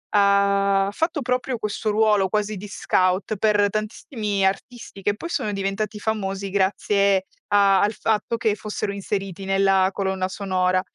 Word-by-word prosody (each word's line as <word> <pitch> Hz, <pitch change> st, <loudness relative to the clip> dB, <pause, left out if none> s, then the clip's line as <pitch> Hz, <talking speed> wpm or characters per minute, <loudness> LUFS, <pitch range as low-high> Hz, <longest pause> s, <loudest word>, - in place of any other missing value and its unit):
ha 200 Hz, -1 st, +3 dB
fatto 320 Hz, -, -1 dB
proprio 250 Hz, 0 st, -1 dB
questo 215 Hz, 0 st, -3 dB
ruolo, 210 Hz, -2 st, +3 dB
quasi 210 Hz, +1 st, -1 dB
di 195 Hz, -, -8 dB
scout 185 Hz, +3 st, 0 dB
per 205 Hz, 0 st, +2 dB
tantissimi 215 Hz, -1 st, -2 dB
artisti 200 Hz, +1 st, -4 dB
che 205 Hz, +1 st, 0 dB
poi 335 Hz, -, -7 dB
sono 215 Hz, -10 st, -2 dB
diventati 200 Hz, +2 st, -3 dB
famosi 195 Hz, -2 st, -2 dB
grazie 200 Hz, 0 st, +1 dB, 0.2 s
a 200 Hz, -2 st, +4 dB
al 210 Hz, -, +2 dB
fatto 220 Hz, +1 st, -1 dB
che 220 Hz, -2 st, +1 dB
fossero 210 Hz, -1 st, -4 dB
inseriti 195 Hz, -1 st, -4 dB
nella 195 Hz, -1 st, +3 dB
colonna 190 Hz, -1 st, -2 dB
sonora. 185 Hz, -1 st, 0 dB
200 Hz, 140 wpm, -23 LUFS, 195-215 Hz, 0.2 s, a